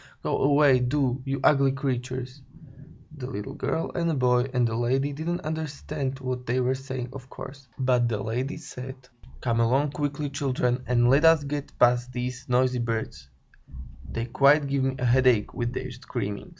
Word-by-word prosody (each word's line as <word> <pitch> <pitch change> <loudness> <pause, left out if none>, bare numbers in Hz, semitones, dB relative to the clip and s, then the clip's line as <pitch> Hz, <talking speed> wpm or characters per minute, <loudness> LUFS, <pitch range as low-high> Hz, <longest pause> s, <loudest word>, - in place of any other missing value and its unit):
Go - - 0
away, 140 -2 +5
do, 130 0 0
you 135 0 -2
ugly 140 -2 +4
creatures!" 130 -1 -3 0.8
The 125 -3 -5
little 105 -5 -5
girl 165 - -2
and 170 -3 0
boy 125 0 +2
and 125 -2 +2
the 115 - -2
lady 130 +4 0
didn't 165 +4 -3
understand 150 -3 -4
what 130 -1 -4
they 125 +2 +1
were 130 +1 +2
saying, 130 -2 -5
of 130 -1 -10
course. 135 -1 -10
But 125 -2 +2
the 110 - -1
lady 125 +7 -2
said: 130 -4 -8 0.5
"Come 115 -1 0
along 135 +5 +2
quickly, 145 0 -3
children, 130 -3 0
and 120 -1 +3
let 140 +3 +4
us 165 -2 +6
get 145 0 -5
past 125 0 +3
these 125 0 -5
noisy 125 0 +2
birds; 110 - -3 0.8
they 115 - -2
quite 140 +4 +4
give 140 -1 0
me 135 0 0
a 125 - -2
headache 125 -3 +3
with 120 -1 -2
their 130 0 -5
screaming." 120 -5 -5
130 Hz, 170 wpm, -26 LUFS, 125-140 Hz, 0.8 s, us